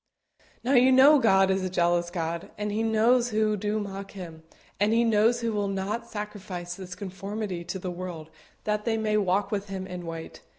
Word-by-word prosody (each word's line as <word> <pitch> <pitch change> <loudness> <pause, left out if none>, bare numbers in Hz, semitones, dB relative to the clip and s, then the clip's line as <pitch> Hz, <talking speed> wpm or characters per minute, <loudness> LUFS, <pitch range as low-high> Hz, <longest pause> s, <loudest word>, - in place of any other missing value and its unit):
Now 255 +3 +1
you 255 0 +6
know 275 +3 +7
God 195 -5 +4
is 190 0 0
a 185 - -1
jealous 175 -1 +1
God, 170 -1 -3
and 210 0 -2
He 215 +2 -1
knows 230 +2 +3
who 215 -1 +1
do 210 +2 -1
mock 195 -1 -6
Him, 170 -5 -9 0.4
and 205 +2 +3
He 230 +1 +4
knows 230 +1 +3
who 230 -1 -1
will 205 -1 0
not 200 +4 -3
sacrifice 200 -4 -6
this 180 -1 -8
conformity 195 -1 -5
to 175 +3 -4
the 185 -1 -4
world 175 -3 -7 0.3
that 210 0 -1
they 225 -1 0
may 215 -1 0
walk 195 0 +1
with 205 -1 -2
Him 190 -1 -4
in 180 -2 -7
white. 165 0 -7
200 Hz, 200 wpm, -27 LUFS, 180-220 Hz, 0.4 s, know